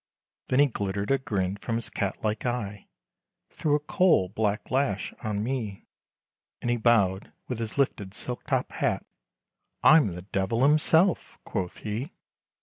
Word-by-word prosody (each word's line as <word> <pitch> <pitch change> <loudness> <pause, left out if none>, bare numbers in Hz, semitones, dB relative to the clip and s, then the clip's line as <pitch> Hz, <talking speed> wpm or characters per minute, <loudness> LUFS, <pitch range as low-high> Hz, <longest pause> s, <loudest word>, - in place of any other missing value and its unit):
Then 130 - +1
he 145 - +7
glittered 100 -4 -2
a 135 - +3
grin, 100 -8 -2
from 115 +2 -3
his 115 -1 -3
cat 100 +2 -3
like 110 0 -1
eye, 105 -5 -3 0.6
Thro' 150 -2 +1
a - - +2
coal 150 - +3
black 105 0 -1
lash 130 -7 0
on 105 -1 -1
me, 115 -5 -3 0.7
And 120 - -1
he 120 - +1
bowed, 100 -5 +2 0.2
with 125 -3 -4
his 115 +1 -4
lifted 105 -8 0
silk 125 -1 -4
top - - 0
hat, - - -1 0.8
"I'm 145 - +6
the 90 - -8
Devil 100 +5 0
himself!" 160 +5 +3
quoth 90 -2 -3
he. 115 - -3
110 Hz, 150 wpm, -27 LUFS, 100-135 Hz, 0.8 s, he